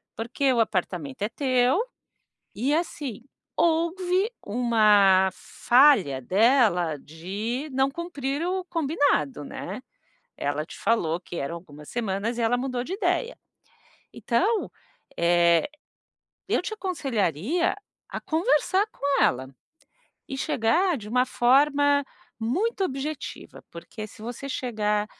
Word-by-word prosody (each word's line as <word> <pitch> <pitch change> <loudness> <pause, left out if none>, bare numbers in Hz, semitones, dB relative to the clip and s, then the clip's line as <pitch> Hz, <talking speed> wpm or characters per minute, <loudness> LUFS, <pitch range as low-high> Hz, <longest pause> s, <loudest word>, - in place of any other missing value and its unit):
porque 245 +5 0
o 240 - +1
apartamento 180 -9 -2
é 210 - 0
teu, 255 - +2 0.7
e 260 +7 0
assim, 300 - -3 0.3
houve 355 +5 +1
uma 205 -4 +4
falha 235 - +3
dela 190 - +3
de 200 - -5
não 270 +1 +2
cumprir 290 -2 -3
o 370 +1 -1
combinado, 285 - 0
né? - - -7 0.6
Ela 145 +2 -2
te - - -11
falou 170 -8 +1
que 175 - -10
eram 140 +3 -3
algumas 150 -4 -12
semanas 225 0 -2
e - - -1
ela 230 +2 +2
mudou 250 -1 -2
de 335 - -5
ideia. 470 +4 -1 0.8
Então, 390 - 0 0.5
eh, 170 -1 +4 0.8
eu - - +1
te - - -5
aconselharia 275 - -1 0.3
a - - -5
conversar 380 +3 +1
com 280 0 0
ela, 130 +1 +1 0.8
e 270 - -5
chegar 305 +6 +1
de 210 -3 -9
uma 250 +2 +2
forma 285 +3 +3 0.3
muito 380 - 0
objetiva, 275 0 -6
porque 215 +6 -8
se 215 - -15
você 240 +4 -6
chegar: 210 -5 -1
245 Hz, 115 wpm, -25 LUFS, 195-295 Hz, 0.8 s, uma